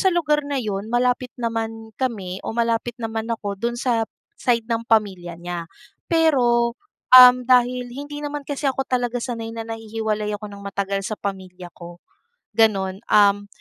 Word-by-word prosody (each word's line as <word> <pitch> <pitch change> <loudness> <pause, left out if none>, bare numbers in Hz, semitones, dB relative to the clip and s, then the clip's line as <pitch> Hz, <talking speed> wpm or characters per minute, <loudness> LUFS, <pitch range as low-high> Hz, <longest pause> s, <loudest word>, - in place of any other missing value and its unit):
sa 380 - +4
lugar 310 -4 +2
na 285 - -1
yun, 210 -3 -3
malapit 250 +1 +1
naman 225 -1 -4
kami 195 -8 -3
o - - -4
malapit 235 0 0
naman 225 -1 -4
ako 205 -3 -3
dun 235 0 -1
sa 235 -3 +1 0.4
side 235 -2 +1
ng 230 0 0
pamilya 190 -6 +1
niya. 175 -1 -5 0.4
Pero, 245 -8 +3 0.4
um, 250 -1 +11
dahil 250 0 +3
hindi 290 +2 -7
naman 290 0 -4
kasi 285 0 -5
ako 270 0 0
talaga 245 -1 0
sanay 230 -3 -4
na 225 - -4
nahihiwalay 220 -1 -3
ako 210 0 -6
ng 200 0 -11
matagal 195 0 -2
sa 215 - -3
pamilya 185 -2 -6
ko, 175 0 -11 0.6
ganun. 195 -4 +2
Um, 205 -1 +4
225 Hz, 160 wpm, -22 LUFS, 200-250 Hz, 0.6 s, um